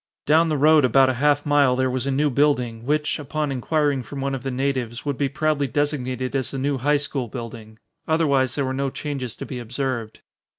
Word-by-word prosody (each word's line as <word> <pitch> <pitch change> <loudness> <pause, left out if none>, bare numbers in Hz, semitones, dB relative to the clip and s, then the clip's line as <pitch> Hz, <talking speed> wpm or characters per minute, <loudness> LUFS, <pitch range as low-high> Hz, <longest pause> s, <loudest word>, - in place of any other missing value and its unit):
Down 160 +3 +4
the 155 -2 0
road 155 +1 +5
about 130 +2 +5
a 130 +1 -6
half 145 0 +3
mile 145 -3 +4
there 130 0 +1
was 130 +1 -2
a - - +1
new 145 +2 +1
building, 125 -4 +1
which, 150 +1 0
upon 150 0 -2
inquiring 145 +1 0
from 140 +3 -8
one 135 0 -2
of 135 - -3
the 135 - -3
natives, 130 -2 -2
would 145 -1 -1
be 140 +1 0
proudly 150 -1 0
designated 130 -3 -2
as 130 -2 0
the 135 - -5
new 135 0 -1
high 145 +4 +2
school 140 -3 -3
building. 110 -1 -8 0.3
Otherwise 140 -6 +2
there 140 - 0
were 130 - -2
no 135 +1 -1
changes 130 -4 -5
to - - -7
be 125 - -6
observed. 120 -1 -4
135 Hz, 215 wpm, -23 LUFS, 125-145 Hz, 0.3 s, road